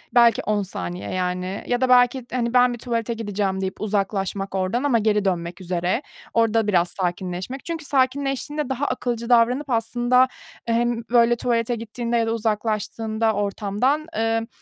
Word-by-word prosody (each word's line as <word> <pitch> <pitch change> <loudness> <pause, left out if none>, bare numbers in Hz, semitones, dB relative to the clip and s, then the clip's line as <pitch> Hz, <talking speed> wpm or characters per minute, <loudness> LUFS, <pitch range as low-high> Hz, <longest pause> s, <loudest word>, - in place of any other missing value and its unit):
belki 235 -1 +6
10 210 -1 +1
saniye 90 - -5
yani 185 +2 -2
ya 245 +1 0
da 260 - +2
belki, 245 0 +4
hani 235 -1 -1
ben 250 -1 +5
bir - - -6
tuvalete 235 -1 -2
gideceğim 205 -3 -2
deyip 190 0 -4
uzaklaşmak 195 -1 -1
oradan 190 +8 0
ama 250 -5 +3
geri 210 -1 +1
dönmek 175 0 -2
üzere, 180 +5 -1 0.3
orada 225 -1 +2
biraz 175 -4 +2
sakinleşmek. 185 +6 -4
Çünkü 330 -3 -4
sakinleştiğinde 275 +2 0
daha 265 +2 -1
akılcı 240 -2 -2
davranıp 250 +4 +3
aslında 240 +2 +3 0.4
hem 235 0 +1
böyle 240 0 +5
tuvalete 235 0 0
gittiğinde 235 +1 -3
ya 230 -1 +1
da 225 - 0
uzaklaştığında 220 0 -1
ortamdan, 205 - 0
ımm, 225 0 0
230 Hz, 150 wpm, -23 LUFS, 195-245 Hz, 0.4 s, belki